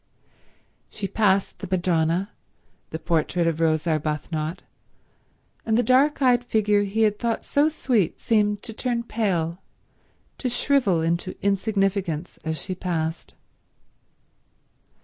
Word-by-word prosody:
She 205 -2 -4
passed 195 -2 +1
the 190 - -6
Madonna, 175 +1 +1 0.6
the 160 - -4
portrait 170 +1 0
of 165 -1 0
Rose 160 -1 +2
Arbuthnot, 155 0 -2 1.0
and 220 0 +1
the 245 - +3
dark 275 +3 +3
eyed 245 -2 +4
figure 210 -3 +2
he 215 +3 0
had 210 -1 +2
thought 235 -2 -1
so 290 +2 +3
sweet 240 - 0
seemed 210 -2 +1
to 225 - -7
turn 235 +1 -2
pale, 185 -7 -1 0.8
to 255 - -1
shrivel 245 - +2
into 170 +3 -1
insignificance 195 -4 0
as 160 -1 -3
she 185 - -4
passed. 165 -3 -3
195 Hz, 120 wpm, -24 LUFS, 165-225 Hz, 1.0 s, eyed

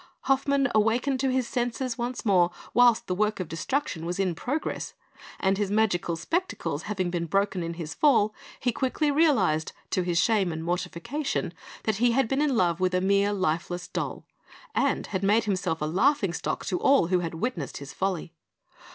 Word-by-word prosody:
Hoffmann 275 0 +2
awakened 235 +5 +2
to 265 0 +1
his 255 -1 0
senses 245 0 -2
once 240 +1 -4
more 180 -4 +4 0.2
whilst 240 0 +5
the 180 - -2
work 210 +3 0
of 185 - -3
destruction 165 - -2
was 175 +1 -3
in 185 -3 +1
progress; 280 - -3 0.4
and 195 +1 +1
his 205 -2 0
magic 205 -4 +1
spectacles 170 - -2
having 185 -4 -1
been 170 -1 -2
broken 195 +1 0
in 170 0 -4
his 165 -2 -5
fall, 230 -8 +3 0.3
he 245 - +1
quickly 270 +5 0
realised, 260 - +2 0.2
to 185 - +1
his 175 -1 -1
shame 205 -5 +2
and 160 0 -5
mortification, 180 - -2 0.3
that 220 -2 0
he 240 +1 +3
had 270 -1 +2
been 270 +4 0
in 285 -5 +2
love 175 -3 +2
with 185 0 +1
a - - +3
mere 200 +2 +2
lifeless 175 -1 -1
doll, - - -4 0.5
and - - +1
had 190 - 0
made 210 +3 +3
himself 180 -6 -1
a - - +1
laughing 195 - +2
stock - - -3
to 180 - -1
all 270 -11 +4
who 180 -1 +3
had 165 -2 -4
witnessed 170 - -3
his 140 0 -9
folly. 185 -3 -2
200 Hz, 185 wpm, -27 LUFS, 175-245 Hz, 0.5 s, whilst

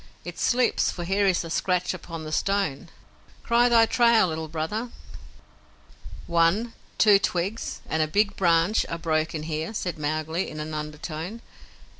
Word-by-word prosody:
It - - -7
slips, 250 0 +2
for 175 - -5
here 195 +3 +1
is 185 -2 +2
a 165 - -7
scratch 180 +1 0
upon 165 -3 -8
the 155 - -7
stone. 180 -3 -1 0.5
Cry 240 +1 +3
thy 230 -1 +6
trail, 235 -5 +4
Little 160 0 -4
Brother." 165 +10 -3 1.4
"One, 170 +8 +2 0.2
two 205 -3 +6
twigs 195 +4 -2
and 160 - 0
a 155 - +2
big 205 +5 +1
branch 170 +3 +3
are 165 - -3
broken 160 -1 -1
here," 160 +6 -4
said 175 -6 -3
Mowgli, 155 +3 -2
in 155 - -8
an 155 +1 -5
undertone. 155 +7 -6
170 Hz, 150 wpm, -25 LUFS, 155-205 Hz, 1.4 s, thy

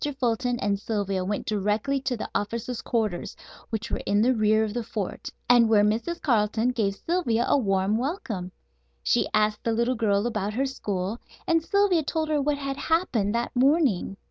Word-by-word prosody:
Fulton 245 0 0
and 200 -3 0
Sylvia 200 -3 -2
went 200 +2 -3
directly 215 +6 0
to 260 -2 -2
the - - -4
officer's 230 +3 -3
quarters, 215 -7 -2 0.3
which 220 -1 -4
were - - -1
in 205 +1 +3
the 255 +2 +4
rear 215 -1 +3
of 215 -1 -3
the 240 - -2
fort, 215 -4 -5 0.2
and 240 -2 +6
where 210 -2 +5
Mrs. 235 +12 0
Carleton 225 -2 +1
gave 215 -6 0
Sylvia 245 - 0
a - - +4
warm 200 -3 +1
welcome. 245 - -3 0.5
She - - +2
asked 215 0 +1
the 230 - 0
little 235 +3 +1
girl 210 -3 +1
about 215 -3 -2
her 270 +3 +1
school 205 -4 -3 0.3
and 330 -1 +2
Sylvia 400 -2 +3
told 315 +1 -2
her 300 -2 +2
what 290 +1 0
had 275 -1 -4
happened 245 - 0
that 235 +2 -2
morning. 255 - +2
230 Hz, 180 wpm, -26 LUFS, 210-265 Hz, 0.5 s, and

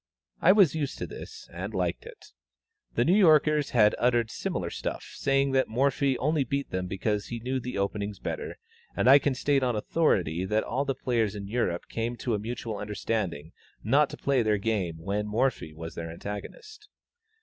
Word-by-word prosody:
I 180 - +7
was 195 -7 +5
used 150 -3 -3
to - - -3
this, - - -10
and 95 +5 -5
liked 90 -2 -2
it. - - -13 0.6
The 120 - +2
New 175 - +4
Yorkers 155 -6 +5
had 105 -3 +4
uttered 120 -2 +2
similar - - -3
stuff, - - -4
saying 135 0 +1
that 130 0 +2
Morphy 135 +2 +1
only 150 +1 +1
beat 140 +3 -3
them 90 0 -2
because 105 +2 -2
he 120 - -4
knew 130 +3 -2
the 125 -2 -5
openings 100 +1 -2
better, - - -5 0.4
and - - +1
I 135 +2 +9
can 140 -2 0
state 140 +1 +2
on 125 -2 +1
authority 95 - +1
that 105 +3 +1
all 135 +4 -1
the 135 -1 -1
players 115 -5 0
in 100 -1 -6
Europe 100 -6 -1
came 115 +1 -3
to 120 - -2
a 105 - 0
mutual 115 0 -4
understanding 100 -6 -3 0.3
not 140 +7 +3
to - - -8
play 140 -3 +1
their 110 -2 +2
game 100 -6 -1
when 100 +5 -2
Morphy 110 -6 0
was 80 +1 -8
their 80 -1 -6
antagonist. 420 - -8
115 Hz, 185 wpm, -28 LUFS, 100-135 Hz, 0.6 s, I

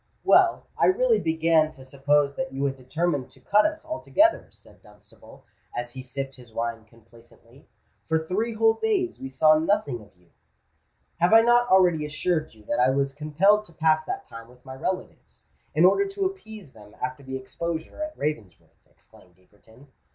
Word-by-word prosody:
"Well, - - +4
I - - +4
really 465 +4 +3
began 160 -1 +2
to 130 - -15
suppose 140 +1 +1
that 175 0 -4
you 135 +1 -2
had 135 -1 -1
determined 145 +2 -2
to 130 - -20
cut 205 - +3
us 315 0 -7
altogether," 315 +1 +1
said - - -21
Dunstable, - - -18 0.3
as 120 0 -4
he 130 - -8
sipped 135 +1 -6
his 120 -3 -16
wine 115 -1 -4
complacently. 115 +3 -21 0.4
"For 160 - +3
three 200 +8 -2
whole 225 0 +4
days 385 - -1
we 135 - -6
saw 155 +3 +4
nothing 160 - 0
of 105 -2 -19
you——" 90 -1 -29 0.9
"Have 175 +5 +3
I 225 - +9
not 240 +1 +3
already 180 -4 +4
assured 150 -1 -2
you 105 - -19
that - - -2
I 125 +1 +4
was 135 0 0
compelled 165 +9 +2
to 170 - -17
pass 155 0 +2
that - - -5
time 115 0 -11
with 125 +1 -21
my 130 - -8
relatives, 185 +8 -6 0.3
in 160 +3 +5
order 395 - +4
to 390 0 -3
appease 220 - -7
them 105 -1 -16
after 130 +2 -4
the 130 -1 -6
exposure 165 - -6
at 310 0 -5
Ravensworth?" 115 - -6
exclaimed 90 -1 -21
Egerton. 110 +8 -22
150 Hz, 180 wpm, -25 LUFS, 130-200 Hz, 0.9 s, I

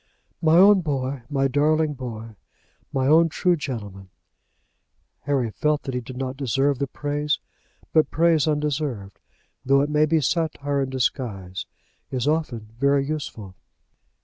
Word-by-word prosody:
"My 160 0 +5
own 195 +1 +7
boy; 135 -4 -2
my 135 -1 +1
darling 150 +3 +2
boy; 115 -4 -7 0.6
my 130 -1 0
own 165 +4 +5
true 180 +3 +2
gentleman!" 105 - -6 1.2
Harry 135 -5 0
felt 150 +5 0
that 135 - -5
he 125 - -2
did 125 +2 -9
not 130 0 -3
deserve 135 +1 0
the 140 - -1
praise; 145 +2 -1 0.6
but 155 -1 +4
praise 165 -1 +3
undeserved, 145 -9 -2 0.4
though 135 +1 +4
it 145 +1 -1
may 150 +1 +3
be 160 +1 +3
satire 145 -2 -1
in 135 - -2
disguise, 105 -8 -3 0.4
is 130 0 -2
often 140 -9 -1
very 140 0 +3
useful. 135 -10 -5
140 Hz, 140 wpm, -24 LUFS, 130-150 Hz, 1.2 s, own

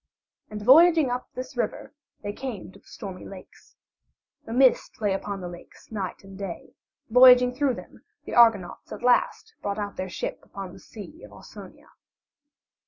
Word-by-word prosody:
And 210 -1 -7
voyaging 315 +2 +6
up 250 +1 -3
this 255 +1 -7
river 245 - -3 0.3
they 205 0 -4
came 235 -7 -7
to 200 - -17
the - - -29
Stormy 190 -3 -9
Lakes. 195 -2 -14 0.7
A - - -7
mist 255 +2 +2
lay 205 -3 0
upon 195 0 -4
the 180 - -5
lakes 175 +5 -13
night 200 -3 -5
and 195 0 -13
day; 190 -3 -7 0.4
voyaging 250 0 +7
through 265 -1 0
them - - -13 0.2
the - - -7
Argonauts 225 -7 +3
at - - -8
last 450 - +1
brought 200 0 -3
out 205 -1 -5
their 185 0 -4
ship - - -5
upon 195 -2 -9
the - - -13
Sea 265 - -12
of - - -12
Ausonia. - - -14
220 Hz, 170 wpm, -25 LUFS, 195-255 Hz, 0.7 s, voyaging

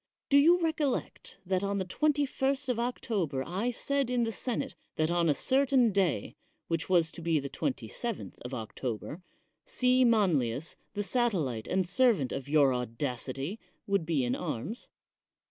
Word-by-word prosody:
Do 280 - +6
you 340 +5 +6
recollect 315 - -2
that 185 0 0
on 200 0 -1
the 190 - -1
21st 280 +2 0
of 240 -2 0
October 200 - -1
I 195 +8 -1
said 275 +2 0
in 245 -1 +1
the 225 - -1
senate 230 -3 -3 0.2
that 155 +1 +1
on 170 -1 +2
a 145 - +3
certain 260 - +3
day, 185 - 0 0.3
which 165 +1 -2
was 170 -3 +3
to - - -10
be 165 -2 +2
the 140 -1 -6
27th 240 - -4
of 125 - -7
Octo 115 -1 -4
ber, 160 - -9 0.4
C. 255 - +2
Manlius, 165 - +2 0.2
the 205 - -1
satellite 180 - 0
and 185 -1 0
servant 220 - +3
of 135 0 -5
your 145 -3 +4
audacity, 130 - -3 0.3
would 195 -5 0
be 155 -6 +1
in 120 0 0
arms? 210 - -4
190 Hz, 160 wpm, -30 LUFS, -, 0.4 s, Do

